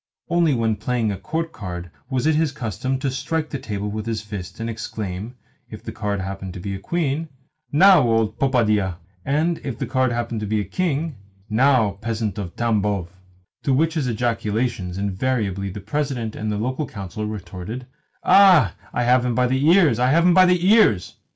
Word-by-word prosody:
Only 170 -4 +3
when 115 -2 0
playing 115 0 -1
a 100 - -4
court 165 0 -3
card 90 - -7 0.2
was 130 0 -1
it 160 - +4
his 155 -1 +1
custom 130 0 -3
to 135 0 -2
strike 155 +4 -2
the 140 - -3
table 105 -2 -4
with 105 +1 -4
his 110 -2 -2
fist, 100 -3 -7
and 115 - -3
to - - -2
exclaim 110 0 -5 0.3
(if - - -10
the - - -6
card 100 -2 -2
happened 95 -1 -6
to - - -6
be 100 +2 -4
a 95 - -5
queen), 160 - -2 0.4
"Now, 185 +3 +7
old 115 -1 +1
popadia 110 -8 +2 0.2
!" 90 -1 -36
and 165 +2 +1
(if 130 -5 -4
the 135 - -2
card 130 +1 +1
happened 120 -1 -2
to 105 - -4
be 110 +1 0
a - - 0
king), 155 - -2 0.3
"Now, 110 -4 +3
peasant 110 -3 -2
of 90 -4 -6
Tambov!" 105 -6 0 0.5
To 135 - +1
which 160 +4 +1
ejaculations 115 - -1
invariably 100 -1 -1
the 100 +2 -7
President 120 0 -2
of 110 - -3
the 105 - -1
Local 130 +6 -2
Council 105 0 -6
retorted, 105 +4 -6 0.4
"Ah, 180 - +6 0.2
I 120 - 0
have 125 +1 +4
him 125 -2 0
by 125 - +3
the 130 +4 +1
ears, 165 - +5
I 125 +1 +3
have 165 +5 +4
him 180 - +6
by 185 0 +7
the 180 0 +2
ears!" 200 - +4
115 Hz, 195 wpm, -22 LUFS, 105-140 Hz, 0.5 s, Now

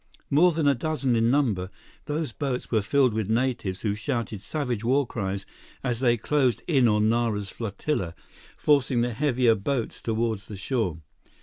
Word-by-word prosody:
More 170 +6 +5
than 160 -2 0
a 140 - +6
dozen 135 -2 0
in 115 0 +3
number, 115 -10 +1 0.4
those 150 -2 -2
boats 130 +1 -3
were 110 -3 +3
filled 130 +3 +2
with 110 -2 -2
natives 115 -6 0
who 105 -3 0
shouted 110 -1 -3
savage 125 -5 -3
war 135 +4 +3
cries 100 -4 -4 0.4
as 120 -2 -1
they 120 -2 +3
closed 130 +1 +1
in 135 -7 +4
on 105 -1 +3
Nara's 110 -3 0
flotilla, 100 - -3 0.4
forcing 135 -4 +3
the 120 0 0
heavier 125 -2 +3
boats 115 +4 -2
toward 115 -1 -1
the 100 +1 -10
shore. 95 - -2
120 Hz, 165 wpm, -26 LUFS, 105-135 Hz, 0.4 s, a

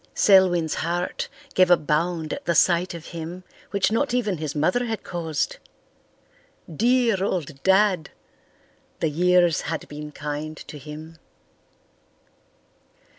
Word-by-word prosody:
Selwyn's 180 -5 +4
heart 175 +2 -2 0.3
gave 185 -1 +4
a 175 - +7
bound 160 +1 -1
at - - -7
the 170 - +1
sight 175 +2 +3
of 165 -1 -9
him 170 +2 -6 0.3
which 200 0 +1
not 245 +2 +1
even 210 -9 0
his 155 -2 -4
mother 180 +12 +1
had 225 -3 -4
caused. 160 -4 -3 1.2
Dear 235 - +2
old 155 -8 -3
Dad! 190 -3 +3 0.9
The 160 - 0
years 175 0 +3
had 160 +1 -4
been 150 0 -8
kind 150 +1 -5
to 150 - -10
him. 155 +3 -10
170 Hz, 125 wpm, -24 LUFS, 155-190 Hz, 1.2 s, a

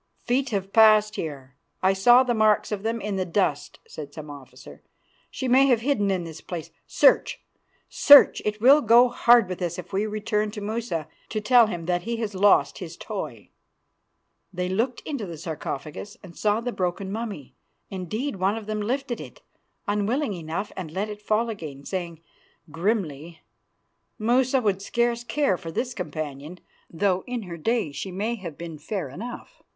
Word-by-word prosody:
"'Feet 260 +3 +1
have 195 -2 -3
passed 215 -1 +6
here; 140 -5 -6 0.3
I 190 +1 +4
saw 240 +7 +6
the 250 -2 0
marks 215 -1 +2
of 205 -2 -2
them 225 +2 -2
in 205 -2 -3
the 185 - 0
dust,' 170 -5 -1
said 145 -2 -8
the 155 - -8
officer. 145 -3 -12 0.5
'She 260 - -4
may 265 +2 +5
have 245 -4 +3
hidden 230 -6 +1
in 185 -2 0
this 165 -1 -9
place. 170 -3 -7 0.2
Search! - - +3 0.5
Search! 285 -1 +7
It 210 0 -2
will 275 +6 +7
go 240 +1 +6
hard 240 -3 +5
with 185 0 -6
us 175 -1 -2
if 180 +1 -9
we 205 +3 0
return 210 0 -1
to 210 - -7
Musa 205 -7 -3 0.2
to 215 - -2
tell 235 +1 +5
him 175 -5 -5
that 175 0 0
he 235 +5 -3
has 220 -3 -3
lost 200 +2 +3
his - - -8
toy.' - - -7 1.0
"They 180 -1 -3
looked 230 +7 -1
into 275 -10 -5
the 165 -2 -7
sarcophagus 155 +4 -6
and 175 -3 -12
saw 210 +1 +1
the 245 +1 -3
broken 190 -1 -3
mummy. 210 - -6 0.4
Indeed, 200 - -4
one 195 +4 +1
of 220 - -7
them 215 0 -3
lifted 250 +2 -2
it, - - -12 0.4
unwillingly 210 - -1
enough, 165 +6 -4
and 180 -4 -6
let 195 +6 -3
it 210 0 -8
fall 215 +2 +1
again, 155 -11 -7
saying 170 -4 -5 0.5
grimly, 165 -4 -2 0.8
"'Musa 250 +4 +2
would 200 -4 0
scarce 235 +3 0
care 240 -7 0
for 165 - -7
this 245 +9 -2
companion, 155 - -6 0.3
though 185 +2 0
in 245 -2 -4
her 175 -3 -7
day 215 0 -1
she 190 - -6
may 210 +6 -2
have 180 -9 -7
been 165 -3 -8
fair 180 +1 -4
enough. 215 - -9
205 Hz, 175 wpm, -25 LUFS, 175-235 Hz, 1.0 s, Search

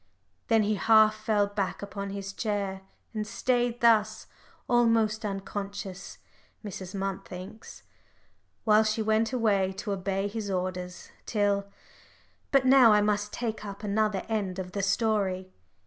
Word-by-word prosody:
Then 225 -2 +4
he 210 +1 +1
half 220 0 +5
fell 215 -1 +1
back 200 -1 -3
upon 200 0 -5
his 195 0 -6
chair, 200 -3 -2 0.3
and 215 -1 -3
stayed 245 +1 0
thus 220 -2 +3 0.4
almost 230 -2 +2
unconscious, 195 -1 -5 0.5
Mrs. 190 -1 -7
Munt 195 0 -3
thinks 190 +4 -10 0.8
while 215 0 +5
she 215 +1 0
went 220 +1 +1
away 205 -6 +1
to 205 +2 -5
obey 195 0 -1
his 205 0 -5
orders, 180 -1 -4 0.2
till 205 -2 +1 0.8
But 275 -2 +4
now 260 -3 +7
I 210 - +5
must 210 0 0
take 225 -3 -4
up 200 0 -8
another 210 -1 0
end 205 -5 -2
of 185 -1 -5
the 200 - -2
story. 195 -3 0
205 Hz, 135 wpm, -28 LUFS, 195-220 Hz, 0.8 s, now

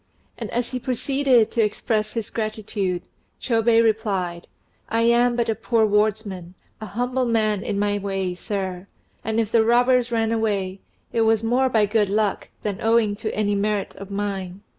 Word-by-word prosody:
And - - -6
as 240 0 -2
he 255 - -2
proceeded 255 -1 +2
to 235 - +1
express 215 0 -1
his 225 -3 -4
gratitude, 215 -4 -2 0.4
Chôbei 230 -1 +3
replied 195 -6 -1 0.4
"I 230 - +1
am 240 +1 +3
but 235 -1 0
a 225 - +2
poor 225 0 +1
wardsman, 205 -4 -1 0.3
a 215 - -5
humble 245 +5 -1
man 215 -3 +1
in 200 - -3
my 205 0 0
way, 195 -2 -2
sir; 190 0 -4 0.4
and 220 +1 -1
if 220 -2 -1
the 230 -1 +4
robbers 245 +1 +3
ran 225 -1 +1
away, 200 -4 -1 0.3
it 230 - +2
was 225 0 +3
more 250 +3 +2
by 220 -4 +3
good 210 -1 +1
luck 210 0 0
than 205 -3 -3
owing 225 -2 +3
to 215 0 -3
any 205 -1 +1
merit 205 0 -1
of 195 0 -9
mine. 200 -1 -4
215 Hz, 170 wpm, -23 LUFS, 200-230 Hz, 0.4 s, the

